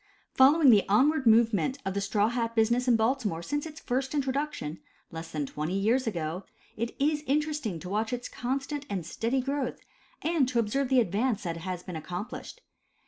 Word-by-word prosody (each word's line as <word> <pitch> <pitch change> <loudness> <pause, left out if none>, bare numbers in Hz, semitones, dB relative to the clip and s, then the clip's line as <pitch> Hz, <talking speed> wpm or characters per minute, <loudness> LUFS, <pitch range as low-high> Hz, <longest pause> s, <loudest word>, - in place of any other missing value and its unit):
Following 275 +1 +6
the 205 -3 +4
onward 265 +6 +3
movement 225 - +4
of 195 - -1
the 200 - -1
straw 205 +1 +1
hat 230 -1 -2
business 235 +3 +2
in 245 - +5
Baltimore 220 -7 0
since 290 - -2
its 310 0 -10
first 265 +3 -2
introduction 275 - -2 0.3
(less 165 0 -7
than 150 -2 -2
twenty 155 +7 -3
years 235 +6 +2
ago), 170 -2 -3 0.3
it 230 +2 -3
is 295 +1 +2
interesting 295 - 0
to 180 - -8
watch 215 +4 -1
its 245 0 -3
constant 275 +3 -3
and 185 -5 -3
steady 230 +9 -1
growth, 275 -1 -3 0.4
and 310 -5 +2
to 250 - -2
observe 240 +4 +1
the 260 -2 +5
advance 215 +2 0
that 170 -2 -3
has 180 +1 -5
been 180 -1 -7
accomplished. 180 - -6
235 Hz, 180 wpm, -28 LUFS, 195-270 Hz, 0.4 s, Following